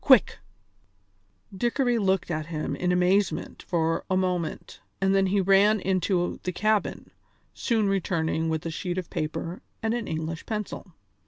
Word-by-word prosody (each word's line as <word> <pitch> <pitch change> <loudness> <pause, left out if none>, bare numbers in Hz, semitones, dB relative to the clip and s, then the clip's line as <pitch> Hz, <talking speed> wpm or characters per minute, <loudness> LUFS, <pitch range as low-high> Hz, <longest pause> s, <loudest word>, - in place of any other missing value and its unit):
Quick!" 260 -7 +5 1.2
Dickory 240 +3 +1
looked 190 -3 +1
at 155 -1 -2
him 155 -2 -3
in 180 0 0
amazement 180 +3 +1
for 165 -2 0
a 185 - +2
moment 180 -3 -2 0.2
and 195 0 +2
then 195 -1 +3
he 200 +2 +2
ran 195 +3 +5
into 185 -1 0
the 180 - -2
cabin, 215 +3 0 0.4
soon 225 -4 +1
returning 165 -4 0
with 160 0 -2
a 165 - -2
sheet 180 +2 -3
of 180 -3 -4
paper 160 +3 -3 0.2
and 225 0 +1
an 235 -3 -2
English 160 +1 -4
pencil. 210 -5 -5
185 Hz, 150 wpm, -26 LUFS, 165-200 Hz, 1.2 s, Quick